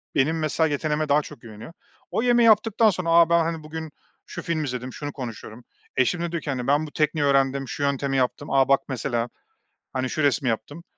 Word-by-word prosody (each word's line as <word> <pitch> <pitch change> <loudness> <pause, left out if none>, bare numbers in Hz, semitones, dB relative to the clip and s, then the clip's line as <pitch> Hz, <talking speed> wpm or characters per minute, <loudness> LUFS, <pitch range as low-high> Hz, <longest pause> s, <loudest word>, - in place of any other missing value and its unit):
benim 155 +4 +2
mesela 155 +1 +1
yeteneğime 150 0 -1
daha 150 +1 +4
çok 120 - -12
güveniyor. 115 +7 -11 0.4
O - - 0
yemeği 240 -1 +4
yaptıktan 220 +1 +4
sonra, 180 -3 -2
a, 170 0 +6
ben, 170 0 +4
hani, 165 -1 -2
bugün 160 0 -7 0.3
şu - - -7
filmi 160 -2 -2
izledim 125 -1 -5
şunu 145 -1 -5
konuşuyorum 120 -2 -8 0.3
eşim 150 +7 +1
de 170 - -2
diyor 170 -1 -3
ki, 145 - -5
hani, 125 -3 -3
ben 145 +3 +2
bu - - -12
tekniği 150 0 0
öğrendim 135 -1 +2
şu 145 - -4
yöntemi 140 -1 0
yaptım, 130 +3 -1
a, 135 -1 +4
bak 140 0 +4
mesela 120 -2 -2 0.6
hani 130 -1 -1
şu 155 - -2
resmi 140 -2 +2
yaptım. 145 +9 -4
145 Hz, 210 wpm, -24 LUFS, 130-160 Hz, 0.6 s, a